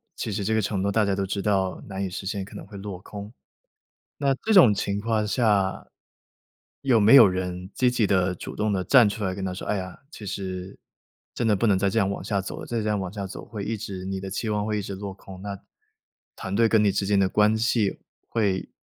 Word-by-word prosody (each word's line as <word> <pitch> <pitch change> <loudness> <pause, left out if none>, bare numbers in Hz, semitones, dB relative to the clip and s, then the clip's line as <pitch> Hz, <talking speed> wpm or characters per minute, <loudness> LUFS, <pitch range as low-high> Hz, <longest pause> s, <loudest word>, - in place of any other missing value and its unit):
其 115 - -4
实 100 0 -2
这 110 - +1
个 110 - +2
承 95 -1 -1
诺 100 - +1
大 110 +2 +3
家 100 -1 +1
都 100 0 -1
知 100 +1 -3
道 95 -2 0
难 100 -1 -4
以 - - -3
实 95 - -5
现， 100 -1 -3
可 - - -13
能 - - -7
会 100 0 -10
落 100 -2 -6
空。 105 +2 -9 0.8
那 140 -1 +2
这 220 - +2
种 170 - +8
情 100 0 -2
况 110 -1 0
下， 105 -5 +1 0.9
有 125 -5 +3
没 105 +4 +6
有 140 - +10
人 90 0 -3
积 125 -1 +2
极 115 -4 +1
地、 95 -2 +2
主 90 - -8
动 105 0 0
地 95 -2 0
站 125 -6 +6
出 105 0 -3
来 95 -1 -2
跟 95 - -5
他 95 -1 -2
说： 90 - -7
“哎 - - +1
呀， 95 -2 -6
其 110 - -10
实 95 -1 -5 0.6
真 120 - -1
的 110 - +4
不 105 +3 +1
能 100 -3 +4
再 100 +1 +1
这 115 - +1
样 100 -3 +2
往 100 - -4
下 100 -2 -1
走 95 - -5
了， - - -7
再 115 -1 -2
这 105 - -3
样 105 -1 +1
往 95 -2 -4
下 100 -1 -5
走 - - -8
会 105 -3 -6
一 115 - -1
直， 100 -3 -6
你 95 0 -3
的 95 - -5
期 100 +4 -3
望 105 -1 0
会 105 -1 -1
一 - - -2
直 100 0 -6
落 100 0 -6
空， 95 -1 -12
那 100 -1 -6 0.8
团 95 - -4
队 115 +1 +4
跟 110 -1 +4
你 100 -2 +3
之 100 - 0
间 100 0 +2
的 95 - +4
关 105 +3 +3
系 110 -2 +1 0.3
会 100 -5 0
100 Hz, 275 characters per minute, -25 LUFS, 95-110 Hz, 0.9 s, 有